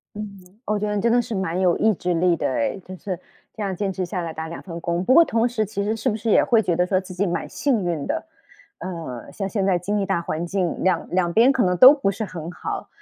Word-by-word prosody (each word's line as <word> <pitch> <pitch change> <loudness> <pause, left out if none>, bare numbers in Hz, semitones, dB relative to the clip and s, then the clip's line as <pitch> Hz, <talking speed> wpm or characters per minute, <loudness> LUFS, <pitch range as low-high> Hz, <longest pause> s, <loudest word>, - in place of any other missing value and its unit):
嗯， 210 0 -4 0.4
我 215 - 0
觉 210 +1 -2
得 210 - -1
你 - - 0
真 230 0 +3
的 240 0 +4
是 235 -1 -6
蛮 185 -2 -1
有 180 -2 +3
意 220 - +4
志 180 0 -2
力 170 +1 +2
的 - - -1
诶， 125 +6 -1
就 185 - -9
是 185 -1 -5 0.4
这 220 - -6
样 195 -2 -2
坚 195 +1 -2
持 185 0 -3
下 180 0 -3
来 165 -1 -4
打 160 +1 -6
2 170 - -7
份 170 -3 -7
工。 170 +2 -1
不 255 - +4
过 335 - +8
同 230 -4 +1
时 230 -3 -1
其 200 -1 -3
实 215 +2 0
是 225 +4 -1
不 215 - -2
是 225 +1 -2
也 - - +5
会 230 -2 +3
觉 180 -4 0
得 180 +2 +2
说 185 +1 +1
自 185 -1 -10
己 195 +3 0
蛮 175 - -2
幸 245 -9 0
运 165 -5 -2
的？ 325 +2 -2 0.5
呃， 165 -10 -7
像 195 -2 -3
现 195 -1 -1
在 190 -2 +2
经 205 +4 -2
济 200 - 0
大 170 - 0
环 165 0 -3
境， 180 0 -2
2 185 -3 +1
2 175 -1 +1
边 235 +8 +5
可 260 - +1
能 180 -1 +1
都 255 +8 +10
不 275 -9 0
是 200 +3 -4
很 170 -4 -7
好， - - -5
190 Hz, 290 characters per minute, -23 LUFS, 175-215 Hz, 0.5 s, 都